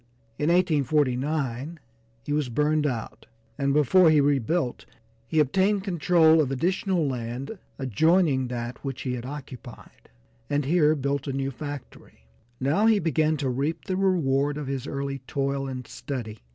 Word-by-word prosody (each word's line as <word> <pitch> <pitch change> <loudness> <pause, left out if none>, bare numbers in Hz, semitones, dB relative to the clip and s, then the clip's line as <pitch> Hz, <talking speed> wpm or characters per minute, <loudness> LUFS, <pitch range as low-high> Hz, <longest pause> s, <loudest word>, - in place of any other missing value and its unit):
In 150 - +1
1849 150 -3 +1 0.5
he 145 - -2
was 150 -4 0
burned 150 +4 +1
out, 120 -5 -5 0.3
and 140 -1 0
before 150 +5 +5
he 155 -1 +5
rebuilt 140 0 0 0.4
he 155 - +1
obtained 190 +7 +2
control 165 -3 +4
of 140 - -1
additional 180 - 0
land 125 - -5 0.2
adjoining 140 - +2
that 120 0 -5
which 135 -2 -5
he 125 - -2
had 125 0 -5
occupied, 135 -4 -10 0.4
and 145 -1 0
here 155 0 +3
built 140 0 -2
a 135 - -2
new 135 0 -2
factory. 145 - -9 0.3
Now 155 +12 +2
he 225 -2 +5
began 155 -3 +1
to 135 -2 -1
reap 140 +6 -2
the 185 - -2
reward 145 -7 +1
of 150 - -4
his 135 0 -4
early 140 0 -3
toil 140 0 -1
and 130 -2 -6
study. 115 -6 -6
145 Hz, 150 wpm, -26 LUFS, 130-160 Hz, 0.5 s, before